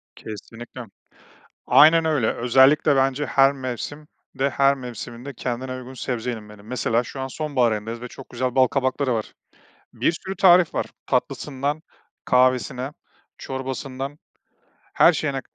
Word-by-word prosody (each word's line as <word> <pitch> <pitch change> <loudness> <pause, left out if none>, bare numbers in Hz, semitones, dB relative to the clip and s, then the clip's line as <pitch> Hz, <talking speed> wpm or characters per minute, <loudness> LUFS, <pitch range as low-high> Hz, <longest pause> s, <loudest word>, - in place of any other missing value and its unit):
Kesinlikle, 115 +3 -9 0.8
aynen 165 +2 +6
öyle, 150 -8 +1
özellikle 135 +4 +4
bence 135 +2 +1
her 135 +2 +4
mevsim 140 +3 -6 0.3
de, 135 +1 +2
her 140 +2 +3
mevsimin 125 -1 -8
de 140 -2 -7
kendine 125 +2 -4
uygun 130 +1 -9
sebze 125 -1 -3
yenilmeli. 105 -3 -9
Mesela, 115 0 0
şu 135 - -8
an 130 - -2
sonbahar 130 -5 0
ayındayız 110 +2 -4
ve 125 - -7
çok 135 - -12
güzel 125 0 -2
bal 130 -1 +5
kabakları 130 0 0
var. 110 -1 -4 0.6
Bir - - +1
sürü 190 +3 -6
tarif 180 -4 +5
var, - - 0 0.2
tatlısından 140 +3 -2 0.4
kahvesine, 125 +1 +2 0.5
çorbasından 135 +1 -5 0.8
her 175 - +6
şeyine 140 -4 -2
130 Hz, 135 wpm, -23 LUFS, 125-140 Hz, 0.8 s, aynen